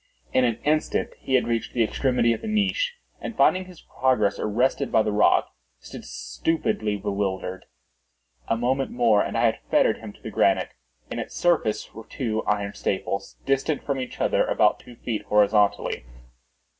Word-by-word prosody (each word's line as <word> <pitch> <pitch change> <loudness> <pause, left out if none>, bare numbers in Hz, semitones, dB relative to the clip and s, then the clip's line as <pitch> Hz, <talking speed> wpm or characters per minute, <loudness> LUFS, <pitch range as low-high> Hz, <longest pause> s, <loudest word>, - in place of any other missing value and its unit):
In 130 - +4
an 115 -2 0
instant 155 +1 0
he 130 - 0
had 130 - +2
reached 115 -1 -2
the 120 - +3
extremity 120 0 +1
of 115 - -6
the - - -6
niche, 215 - +1 0.2
and 230 - -6
finding 185 0 +4
his 180 -3 -14
progress 125 -6 +1
arrested 125 +6 0
by 110 - +4
the 105 - -1
rock, 105 - +3 0.3
stood - - -10
stupidly 110 -10 -2
bewildered. 95 -2 -3 0.8
A 115 - +1
moment 130 +3 0
more 115 -4 +3
and - - -2
I 115 - +3
had 110 - +1
fettered - - +3
him - - -8
to - - -21
the - - -6
granite. - - +2 0.4
In - - -3
its - - -6
surface 165 -11 +1
were 110 0 -11
two 110 -4 -2
iron 100 -1 0
staples, 100 +1 -3
distant 135 +2 0
from 140 -2 -2
each 130 - -6
other - - +2
about - - +2
two 120 - -14
feet, 115 -2 -3
horizontally. 105 - +2
120 Hz, 170 wpm, -25 LUFS, 105-135 Hz, 0.8 s, In